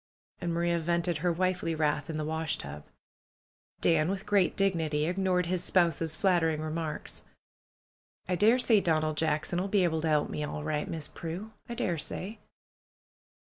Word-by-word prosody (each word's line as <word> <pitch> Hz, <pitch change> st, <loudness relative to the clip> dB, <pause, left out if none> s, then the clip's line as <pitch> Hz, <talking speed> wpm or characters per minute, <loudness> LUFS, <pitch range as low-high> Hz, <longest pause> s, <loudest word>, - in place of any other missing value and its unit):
And 170 Hz, -, -2 dB
Maria 170 Hz, 0 st, +1 dB
vented 170 Hz, 0 st, 0 dB
her 175 Hz, +2 st, +1 dB
wifely 185 Hz, -1 st, 0 dB
wrath 150 Hz, -1 st, 0 dB
in 160 Hz, -, -3 dB
the 155 Hz, -, -2 dB
washtub. 145 Hz, -, -3 dB, 0.9 s
Dan, 160 Hz, -1 st, +3 dB
with 195 Hz, 0 st, -3 dB
great 200 Hz, -3 st, +2 dB
dignity, 160 Hz, -6 st, +1 dB
ignored 180 Hz, 0 st, +1 dB
his 180 Hz, +1 st, -1 dB
spouse's 165 Hz, -4 st, +2 dB
flatter 175 Hz, -2 st, +3 dB
ing 155 Hz, -1 st, -2 dB
remarks. 155 Hz, 0 st, -4 dB, 1.1 s
"I 180 Hz, -, +1 dB
daresay 225 Hz, +3 st, +4 dB
Donald 155 Hz, -3 st, +1 dB
Jackson 160 Hz, +2 st, 0 dB
'ull 190 Hz, -, -1 dB
be 200 Hz, -1 st, +3 dB
able 160 Hz, -2 st, +1 dB
to 160 Hz, -, 0 dB
'elp 150 Hz, -1 st, +2 dB
me, 150 Hz, -, -3 dB
all 150 Hz, 0 st, -4 dB
right. 150 Hz, -1 st, -1 dB
Miss 160 Hz, -3 st, -4 dB
Prue. 180 Hz, +6 st, -6 dB, 0.2 s
I 235 Hz, -, -4 dB
daresay." 180 Hz, +3 st, -3 dB
165 Hz, 155 wpm, -30 LUFS, 155-185 Hz, 1.1 s, daresay